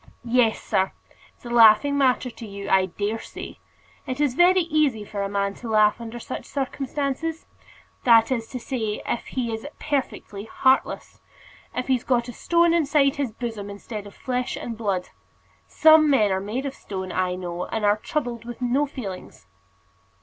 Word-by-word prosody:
"Yes, 235 -2 +3
sir; 190 0 0 0.4
it's - - -24
a - - -6
laughing 230 +4 +6
matter 260 -2 +2
to 225 -1 -10
you, 200 0 -7
I 190 -1 +4
dare 205 +5 -3
say. - - -9 0.5
It 255 +1 -4
is 290 -4 +2
very 360 +5 +5
easy 305 -10 +1
for 205 -1 -5
a 200 - -2
man 200 0 -1
to 235 - -6
laugh 215 +1 +3
under 230 +1 -7
such 240 - -6
circumstances; 280 +3 -3 0.6
that 230 0 +5
is 230 -3 -1
to 255 - -6
say, 225 -4 -3
if 235 - -3
he 240 -3 -2
is 225 +5 -5
perfectly 260 -8 -3
heartless, 260 +4 0 0.5
if 250 - -2
he's 255 -2 +1
got 240 -2 +1
a 245 - -7
stone 340 +6 +2
inside 290 -4 +3
his 275 -5 -1
bosom 225 -3 -5
instead 205 +1 -7
of 200 - -14
flesh 250 -1 -2
and 230 - -5
blood. 200 -5 -2 0.6
Some 315 -1 +6
men 215 -8 +4
are 190 0 0
made 225 +7 -3
of 275 - -3
stone, 190 -6 -6
I 185 -1 0
know, 175 -1 -5
and 220 -2 -2
are 205 +1 +4
troubled 240 -2 -3
with 240 0 -8
no 255 +4 +1
feelings." 200 - -8
235 Hz, 175 wpm, -24 LUFS, 210-270 Hz, 0.6 s, laughing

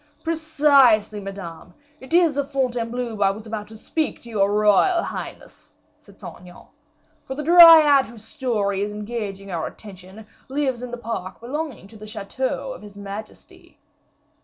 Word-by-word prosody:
"Precisely, 285 -10 +3
Madame, 195 -3 -9 0.2
it 260 - -14
is 335 -4 +4
of 285 -1 -2
Fontainebleau 245 -4 -2
I 195 - +4
was 210 +3 -6
about 215 -2 -6
to 220 +1 -12
speak 310 +7 -3
to 235 - -11
your 200 -2 +1
royal 210 - +3
highness," - - -9 0.3
said - - -21
Saint - - -10
Aignan; 180 0 -15 0.6
"for 265 - -5
the 300 - -5
Dryad 320 -4 +8
whose 225 -2 -13
story 220 -7 -2
is 205 +1 -2
engaging 205 -2 -6
our 165 -2 -3
attention, 195 +1 -12 0.2
lives 265 -3 -1
in 250 - -6
the 245 - -6
park 225 -5 -6
belonging 270 -2 -6
to 220 +2 -15
the 215 0 -11
chateau 260 +5 -4
of - - -12
his 205 -1 -13
majesty." 200 +2 -10
230 Hz, 160 wpm, -22 LUFS, 205-275 Hz, 0.6 s, Dryad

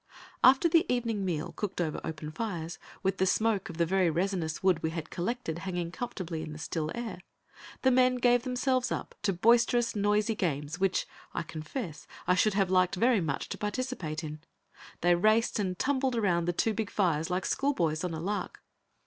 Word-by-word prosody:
After 265 +6 +7
the 330 0 +3
evening 230 -4 0
meal, 165 -5 -2
cooked 200 -3 -4
over 160 -3 -1
open 155 -1 -5
fires, 170 -3 -4 0.2
with 190 0 0
the 190 - +3
smoke 215 -1 +1
of 165 - -8
the 170 - +3
very 185 0 +2
resinous 170 -1 -1
wood 185 -4 +3
we 160 - 0
had 160 -1 -6
collected 180 -3 -3
hanging 175 -2 -3
comfortably 180 -7 -4
in 155 - -6
the - - -8
still 155 0 -3
air, 235 -6 -5 0.6
the 260 - +5
men 255 0 +4
gave 245 -1 +4
themselves 255 0 0
up - - -3
to 205 - +1
boisterous, 235 +5 +3
noisy 210 +2 +2
games, 155 -4 -2
which, 190 -1 +1 0.3
I - - -1
confess, 160 - -6 0.2
I 180 - +4
should 195 +2 +3
have 195 -2 +2
liked 185 0 +3
very 230 +2 +3
much 145 -5 -2
to - - -5
participate 205 -8 -3
in. 155 0 -6 0.6
They 175 +1 +5
raced 215 +6 +3
and 185 -3 -1
tumbled 265 0 +1
around 180 -7 +2
the 175 - +1
two 220 +5 +1
big 220 -1 -2
fires 165 -5 +1
like 180 +1 -1
schoolboys 170 - 0
on 175 -3 -2
a - - -4
lark. 200 +5 -3
190 Hz, 190 wpm, -30 LUFS, 165-230 Hz, 0.6 s, After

